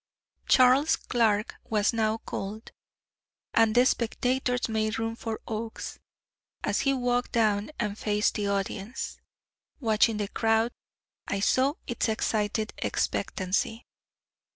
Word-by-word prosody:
Charles 260 +4 +5
Clark 220 -4 0
was 215 +1 +1
now 220 -1 +1
called, 215 0 -6 0.8
and 225 -1 +4
the 245 +1 +6
spectators 250 +1 0
made 220 -1 0
room 225 0 -2
for 225 -1 -4
Oakes, 225 0 -5 0.6
as - - +1
he 275 - +2
walked 245 -1 0
down 215 -3 +2
and 210 -3 -1
faced 210 -1 +1
the 205 -2 -1
audience. 200 +3 -3 0.6
Watching 220 -3 +3
the 205 -1 -1
crowd, 225 +2 +1 0.6
I 200 - -1
saw 260 +7 +3
its 240 0 -1
excited 215 0 0
expectancy. 195 +5 -1
225 Hz, 115 wpm, -28 LUFS, 210-240 Hz, 0.8 s, the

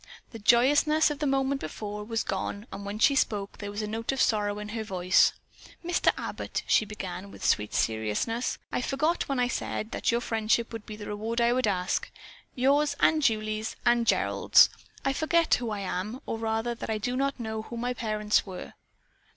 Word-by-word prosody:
The 225 - -8
joyousness 290 +8 +4
of 290 - -5
the 295 - 0
moment 270 0 +1
before 210 +5 -5
was 225 +1 -2
gone 200 +2 -3
and 195 +1 -6
when 205 +1 -4
she 250 +6 +5
spoke 210 -8 -1
there 205 - -5
was 205 +1 -4
a - - -3
note 225 +3 -2
of 270 - -3
sorrow 205 -3 +2
in 210 0 -6
her 220 0 -3
voice. 185 -3 +3 0.5
"Mr. 350 0 +3
Abbott," - - -4
she 215 - +3
began 195 -2 -6
with - - -8
sweet 105 -1 +2
seriousness, 110 - -1
"I - - -1
forgot 305 +7 0
when 275 - 0
I 245 - +3
said 220 -2 -3
that - - 0
your 235 - +2
friendship 225 0 0
would 225 -2 -7
be 215 - -6
the 210 -1 -8
reward 220 +3 -3
I 235 0 +3
would 255 -2 +1
ask, 180 -3 -1 0.5
yours 285 +4 +3
and 315 -1 +4
Julie's 215 -3 0
and 240 -1 +3
Gerald's - - +5 0.4
I 270 - +2
forgot 330 +3 +2
who 240 -2 +1
I 210 -2 -3
am, 195 +6 -3
or 225 - -3
rather 225 +1 -1
that 235 - -7
I 220 - 0
do 245 +4 -2
not 275 +1 -1
know 220 -1 -3
who 235 +2 -8
my 245 +2 -1
parents 215 -3 +1
were. 185 -2 -8
225 Hz, 200 wpm, -28 LUFS, 210-250 Hz, 0.5 s, she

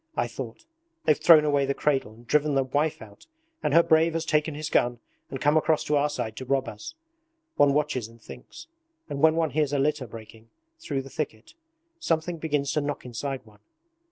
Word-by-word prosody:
I - - +2
thought: 330 - -8 0.4
they've 155 - +5
thrown 155 0 +6
away 145 -2 +2
the 140 - 0
cradle 135 -7 0
and 115 +2 -17
driven 150 +3 +2
the 135 - +3
wife 145 0 -1
out, 100 -2 -16 0.3
and - - 0
her 165 +3 +6
brave 160 +1 +3
has 165 0 -1
taken 155 -1 +1
his 155 +1 -4
gun 120 0 +2 0.3
and 135 - -5
come 145 +2 +2
across 155 0 +2
to 150 - 0
our 145 +1 +2
side 110 -7 -4
to 130 - -6
rob 135 -1 0
us. 105 - -8 0.6
One 140 -1 +4
watches 145 -6 0
and 115 +1 -18
thinks. 315 - -12 0.4
And 140 - -4
when 160 0 +5
one 165 -3 +1
hears 150 -1 0
a - - +2
litter 140 -1 0
breaking 110 0 -12 0.3
through 140 - -3
the 135 - -12
thicket, 110 -8 -5 0.5
something 165 - -1
begins 145 -3 -1
to 150 - 0
knock 145 -2 -4
inside 130 +2 -5
one. 105 -2 -20
145 Hz, 205 wpm, -26 LUFS, 130-155 Hz, 0.6 s, thrown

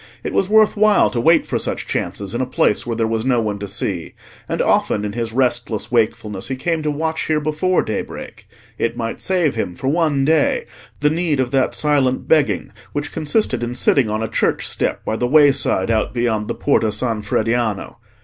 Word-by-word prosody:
It - - -4
was 190 - +1
worth 215 0 +5
while 215 0 +4
to 120 - -1
wait 165 +7 +4
for - - -2
such - - -3
chances 100 -1 -3
in 120 - -1
a 130 - -1
place 120 -3 +1
where 115 - -2
there 115 0 0
was 110 0 -1
no 125 -1 +2
one 105 -3 -2
to 100 - -5
see, 95 -3 -4 0.3
and - - -2
often 105 - +1
in 105 - -4
his 115 0 -3
restless 120 -3 -1
wakefulness 110 -4 0
he 130 - -2
came 165 +4 -1
to 155 - -1
watch 160 +2 -2
here 155 -1 +2
before 155 +5 0
daybreak; 110 - -6 0.3
it 115 0 -1
might 115 -1 -4
save 180 -6 +1
him 90 -6 -3
for 130 - -2
one 150 -3 +1
day 155 0 +2 0.4
the 150 0 +3
need 160 -3 0
of 125 -2 0
that 135 -1 +1
silent 140 -4 +1
begging 155 -3 +2 0.2
which 145 0 -3
consisted 160 - 0
in 120 +1 -3
sitting 125 -1 +2
on 110 +1 -1
a - - -1
church - - 0
step - - -2
by 110 - -1
the 120 +2 -1
wayside 140 -8 +3
out 110 +2 0
beyond 110 -3 0
the - - -3
Porta 115 -6 +1
San 115 -1 -1
Frediano. 110 0 -1
125 Hz, 205 wpm, -19 LUFS, 110-150 Hz, 0.4 s, worth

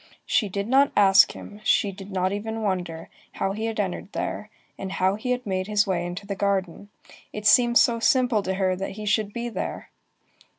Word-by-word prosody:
She 210 - +1
did 200 +2 -3
not 275 +3 +4
ask 195 -1 +6
him, 210 +1 -11
she 205 - +2
did 195 0 -11
not 185 0 0
even 220 +2 -4
wonder, 175 -5 -3 0.3
how 195 - -1
he 215 +3 -4
had 225 -1 -4
entered 195 0 -3
there, 210 - -4 0.3
and 190 0 -6
how 185 +1 +1
he 215 +5 -5
had 250 0 -1
made 185 -1 -2
his 210 -1 +2
way 175 -3 -1
into 180 +3 -7
the 200 - -3
garden. 200 -1 -2 0.4
It 210 0 -7
seemed 240 +2 +5
so 235 -1 +4
simple 250 -3 +2
to 190 -1 -2
her 185 -1 +1
that 195 +1 -5
he 210 +1 -7
should 210 0 +1
be 235 +2 -4
there! 235 - -5
200 Hz, 205 wpm, -24 LUFS, 190-220 Hz, 0.4 s, ask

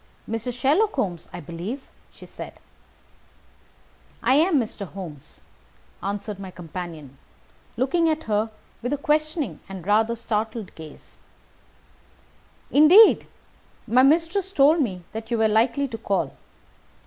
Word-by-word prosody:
"Mr. 225 +2 -3
Sherlock 295 - +2
Holmes, 180 - -3
I - - -7
believe?" 180 - -6 0.3
said - - -10
she. - - -22 1.6
"I 245 +3 +4
am 310 +2 +4
Mr. 215 -4 -4
Holmes," 165 -7 -10 0.6
answered 200 0 -4
my 195 -1 -7
companion, 165 -5 -8 0.6
looking 325 +7 +2
at 315 0 -1
her 215 0 0 0.3
with 245 +4 -2
a - - 0
questioning 305 - -1
and 190 -3 -8
rather 220 +3 +2
startled 220 -2 -3
gaze. 155 -2 -13 1.5
"Indeed! 350 +10 +7 0.6
My 245 +3 +4
mistress 330 +7 +2
told 305 -1 +5
me 185 -9 -2
that 220 0 -7
you 235 - 0
were 220 0 +4
likely 235 +6 +2
to 225 -2 -6
call. 185 -9 -1
225 Hz, 125 wpm, -24 LUFS, 195-290 Hz, 1.6 s, Indeed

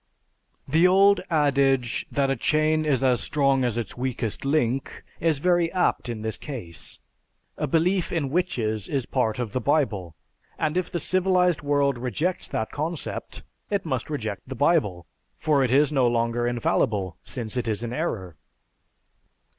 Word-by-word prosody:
"_) - - -10
The 165 +3 +6
old 195 +2 +5
adage 140 -5 +2
that 135 -1 +1
a - - +1
chain 155 +4 +1
is 140 -4 +2
just - - -1
as 125 -3 +3
strong 140 -2 +2
as 120 -2 0
its 115 -5 -4
weakest 125 -4 -3
link 135 -3 0 0.2
is 160 -3 +2
very 175 +2 +2
apt 180 -8 +1
in 110 -2 -4
this 110 0 -3
case. 115 - -6 0.6
A - - -2
belief 175 +5 +1
in 145 -6 -1
witches 115 - 0
is 135 -4 -1
part 115 -5 0
of 120 -4 -3
the 130 - -2
Bible; 110 - 0 0.4
and 155 +1 -1
if 185 -1 0
the 175 - -2
civilized 180 -1 +2
world 140 -3 +1
rejects 150 +9 -1
that 110 - -3
concept, 160 +2 -4 0.3
it 200 -3 -1
must 130 -5 -2
reject 110 -9 -3
the 130 - -6
Bible, 115 - +1 0.3
for 145 -3 +2
it 130 - +1
is 140 +3 +4
no 135 -4 +3
longer 120 0 0
infallible, 105 -5 0
since 115 -3 -4
it 120 -2 -1
is 110 +1 -1
in 120 0 -4
error. 105 - -3
135 Hz, 165 wpm, -25 LUFS, 120-155 Hz, 0.6 s, The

